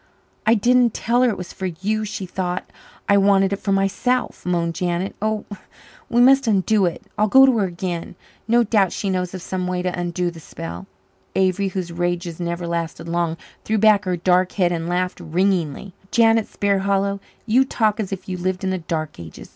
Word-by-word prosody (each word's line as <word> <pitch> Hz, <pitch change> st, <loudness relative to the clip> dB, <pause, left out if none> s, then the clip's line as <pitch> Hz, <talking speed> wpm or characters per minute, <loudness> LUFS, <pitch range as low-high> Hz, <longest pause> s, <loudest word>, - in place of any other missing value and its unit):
"I 225 Hz, -, +6 dB
didn't 240 Hz, +1 st, +3 dB
tell 240 Hz, +2 st, +1 dB
her 255 Hz, -, +4 dB
it 215 Hz, -, -2 dB
was 180 Hz, -1 st, -7 dB
for 190 Hz, -, -4 dB
you 205 Hz, +5 st, -2 dB
she 200 Hz, -2 st, -5 dB
thought 180 Hz, 0 st, -3 dB, 0.4 s
I 200 Hz, -, +5 dB
wanted 195 Hz, 0 st, +4 dB
it 200 Hz, -, -3 dB
for 200 Hz, -, -2 dB
myself," 195 Hz, +6 st, 0 dB
moaned 170 Hz, -2 st, 0 dB
Janet. 175 Hz, +2 st, -2 dB
"Oh, 215 Hz, 0 st, -1 dB, 0.6 s
we 240 Hz, -, +3 dB
must 270 Hz, +1 st, +5 dB
undo 205 Hz, -1 st, +3 dB
it 170 Hz, -, -5 dB, 0.2 s
I'll 215 Hz, -, +4 dB
go 265 Hz, +5 st, +7 dB
to 260 Hz, -2 st, +3 dB
her 200 Hz, -, +2 dB
again 175 Hz, -1 st, -4 dB, 0.3 s
no 235 Hz, +1 st, +4 dB
doubt 200 Hz, -5 st, +2 dB
she 195 Hz, -, -2 dB
knows 180 Hz, 0 st, -2 dB
of 180 Hz, -, -7 dB
some 185 Hz, -1 st, -3 dB
way 180 Hz, 0 st, -2 dB
to 180 Hz, -1 st, -2 dB
undo 175 Hz, 0 st, -1 dB
the 165 Hz, -, -11 dB
spell 85 Hz, -, -8 dB, 0.2 s
" 95 Hz, 0 st, -40 dB
Avery, 190 Hz, +1 st, +2 dB
whose 185 Hz, -2 st, -4 dB
rages 175 Hz, -1 st, -2 dB
never 170 Hz, 0 st, -3 dB
lasted 170 Hz, 0 st, -3 dB
long, 170 Hz, -1 st, -1 dB, 0.3 s
threw 220 Hz, -, 0 dB
back 210 Hz, -1 st, +4 dB
her 180 Hz, -1 st, -1 dB
dark 180 Hz, +1 st, +2 dB
head 180 Hz, -3 st, +2 dB
and 170 Hz, 0 st, -2 dB
laughed 180 Hz, +1 st, -1 dB
ringingly. 180 Hz, 0 st, -1 dB, 0.2 s
"Janet 225 Hz, -2 st, +3 dB
Sparhallow, 200 Hz, 0 st, 0 dB, 0.3 s
you 240 Hz, +4 st, +4 dB
talk 220 Hz, -4 st, 0 dB
as 205 Hz, -3 st, -3 dB
if 195 Hz, -, -6 dB
you 185 Hz, -1 st, -3 dB
lived 185 Hz, +1 st, -2 dB
in 190 Hz, -, 0 dB
the 185 Hz, -, -1 dB
dark 160 Hz, -2 st, -4 dB
ages! 80 Hz, -3 st, -10 dB
190 Hz, 200 wpm, -21 LUFS, 175-210 Hz, 0.6 s, go